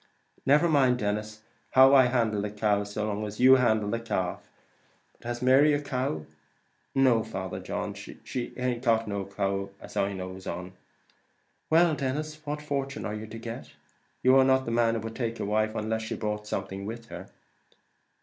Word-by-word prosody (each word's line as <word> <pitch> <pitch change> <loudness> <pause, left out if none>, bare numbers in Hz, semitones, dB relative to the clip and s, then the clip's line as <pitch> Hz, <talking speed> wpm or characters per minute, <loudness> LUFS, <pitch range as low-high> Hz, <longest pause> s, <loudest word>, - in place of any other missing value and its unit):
"Never 150 +5 +5
mind, 135 -6 +3
Denis, 105 0 -3 0.3
how 130 +1 +7
I 130 -2 +7
handle 115 -5 +1
the 105 - -2
cow, 105 -1 +1
so 105 +1 -3
long 105 0 -2
as 105 0 -6
you 130 +1 +8
handle 110 -4 +2
the 115 - -1
calf; 95 -6 -2 0.7
but - - -13
has 120 +1 -4
Mary 135 +4 +5
a 145 - +2
cow?" 125 - -2 0.7
"No, 130 -4 +4
Father 95 -4 -5
John, - - -4
she 125 -2 -6
aint 125 -1 -2
got 115 -2 +2
a 100 -1 -3
cow 100 0 -2
then, - - -15
as - - -12
I 100 0 0
knows 95 0 -7
on." 90 +2 -5 1.0
"Well, 165 +1 +5
Denis, 150 +2 -2
and 155 0 -23
what 150 +1 -4
fortune 140 -1 -3
are 105 - -3
you 110 +1 -6
to 110 +1 -8
get? 115 0 -8 0.5
You 130 +1 +6
are 135 - +7
not 130 0 +3
the 115 - -3
man 115 -1 +2
would 115 +1 -6
take 115 -2 -3
a - - -2
wife 110 +1 0
unless 110 +1 -1
she 110 +1 -4
brought 105 -1 -3
something 95 -1 -4
with 115 +1 -7
her." - - -9
115 Hz, 190 wpm, -28 LUFS, 105-130 Hz, 1.0 s, you